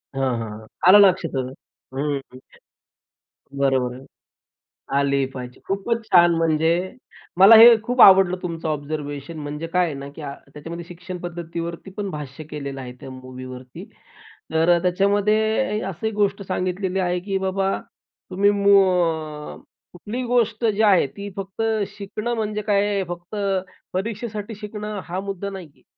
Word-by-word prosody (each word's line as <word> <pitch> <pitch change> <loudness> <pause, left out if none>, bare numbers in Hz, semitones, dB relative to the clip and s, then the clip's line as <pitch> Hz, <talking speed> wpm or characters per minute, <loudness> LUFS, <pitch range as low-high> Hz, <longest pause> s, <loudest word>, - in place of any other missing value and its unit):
हां, 130 -3 0
हां, 115 -1 -5
हां.आला 180 - +4
लक्षात 185 -4 +4
अ, - - +1 0.6
हं 145 +1 -1 1.4
बरं, 135 -1 +3
बरं 130 +2 -10 0.9
आली 140 -1 +1
पाहिजे. 125 -1 -8
खूपच 225 +4 -1
छान 175 -3 +6
म्हणजे 160 0 +2 0.7
मला 200 +4 +9
हे 230 +1 +10
खूप 245 +2 +1
आवडलं 190 -2 +7
तुमचं 165 -2 -4
ऑब्झर्वेशन 145 0 -5
म्हणजे 150 +2 -5
काय 180 +1 +2
आहे 155 - -3
ना, 140 0 -7
की - - -9
अ, 140 -2 -5 0.2
त्याच्यामध्ये 165 +3 -8
शिक्षण 180 +1 -8
पद्धतीवरती 170 +1 -6
पण 205 -1 -3
भाष्य 150 0 -7
केलेलं 140 -2 -6
आहे, 125 -1 -7
त्या - - -9
मूव्हीवरती. 130 -1 -10 0.7
तर 160 +2 +2
अ, - - +2
त्याच्यामध्ये 210 +5 +1
अ, 190 - -3
अशी 195 +4 -3
गोष्ट 205 -1 0
सांगितलेली 185 +1 -2
आहे, 180 -1 0
की 195 +1 -2
बाबा 190 0 -1 0.5
तुम्ही 200 +2 +3
मू 200 -1 +5
अ, 160 -5 -1 0.4
कुठलीही 215 +8 -5
गोष्ट 235 -2 +1
जी 220 -1 +2
आहे, 195 -8 +5
ती 200 +8 -8
फक्त 195 +3 -5 0.3
शिकणं 215 +4 -4
म्हणजे 210 -1 -2
काय 205 -1 +2
आहे? 200 -1 0
फक्त 175 +4 -7 0.6
परीक्षेसाठी 215 +2 -4
शिकणं 210 -1 -5
हा 180 +2 -4
मुद्दा 200 0 -5
नाही 190 -4 -8
आहे. - - -28
180 Hz, 150 wpm, -22 LUFS, 150-205 Hz, 1.4 s, हे